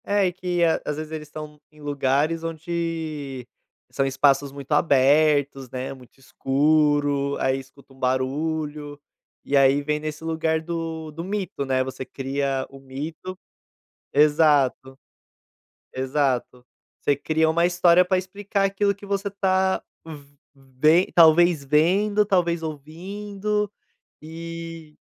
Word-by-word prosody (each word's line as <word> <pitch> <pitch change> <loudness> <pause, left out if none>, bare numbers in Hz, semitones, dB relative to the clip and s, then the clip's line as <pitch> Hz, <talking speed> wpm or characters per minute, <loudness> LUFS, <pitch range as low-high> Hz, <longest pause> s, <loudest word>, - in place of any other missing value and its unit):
É 200 -3 +2
que 180 -1 -1 0.2
às 150 - -3
vezes 155 0 -6
eles 155 -1 -6
estão 150 0 -9
em 150 - -20
lugares 145 +3 0
onde 160 -5 -4 0.4
são 135 - 0
espaços 135 +1 +2
muito 140 +1 -10
abertos, 145 -2 +3
né, 130 +2 -5
muito 130 -1 -17
escuro, 145 +1 +1
aí 130 0 +1
escuta 135 +1 -16
um 135 - -20
barulho, 145 +3 -2 0.4
e 140 - -1
aí 135 +1 +4
vem 150 +1 -1
nesse 155 +1 -6
lugar 160 0 0
do 165 -1 -5
do 165 +2 -7
mito 190 -7 -3
né, 130 -1 +1
você 130 0 -6
cria 135 0 -2
o 135 - -13
mito. 155 +7 -7 0.8
Exato, 145 -3 +3 1.0
exato, 130 -2 -1 0.4
você 145 - +1
cria 160 +3 +1
uma 170 +2 +2
história 175 0 +4
para 185 +1 +1
explicar 200 +2 -2
aquilo 200 +1 +1
que 200 +1 -13
você 200 0 -2
tá 190 -1 +1 0.7
ve 140 +6 +2
talvez 165 -2 +5
vendo, 195 +9 +2
talvez 175 -4 +1
ouvindo, 195 +7 -4 0.5
e 165 0 -8
155 Hz, 120 wpm, -24 LUFS, 140-170 Hz, 1.0 s, talvez